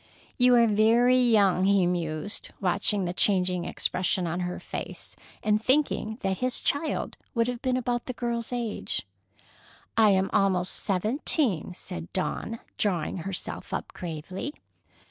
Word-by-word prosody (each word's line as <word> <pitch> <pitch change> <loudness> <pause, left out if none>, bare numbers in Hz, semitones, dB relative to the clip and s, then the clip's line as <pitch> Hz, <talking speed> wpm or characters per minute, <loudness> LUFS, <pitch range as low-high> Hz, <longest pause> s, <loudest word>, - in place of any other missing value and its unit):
"You 250 0 +6
are 235 -1 +6
very 230 +4 +4
young," 205 -6 +4
he 195 -2 +4
mused, 175 +1 -2
watching 195 +1 +1
the 175 - -2
changing 180 -2 +2
expression 180 0 0
on 170 +1 -2
her 180 0 -3
face, - - -6 0.3
and 215 0 +2
thinking 255 -5 +1
that 190 -2 -1
his 255 -1 +1
child 300 +2 -1 0.2
would 230 0 +2
have 245 -1 -3
been 255 -2 +1
about 245 -1 -2
this 255 - -4
girl's 235 -1 -3
age. 240 -3 -2 0.9
"I 220 -2 +6
am 190 -1 +2
almost 185 -2 +2
seventeen," 210 - 0
said 175 -2 -7
Dawn, 220 +4 -2 0.2
drawing 180 -5 0
herself 185 +1 -5
up - - -4
gravely. 180 - -5
205 Hz, 140 wpm, -27 LUFS, 180-240 Hz, 0.9 s, You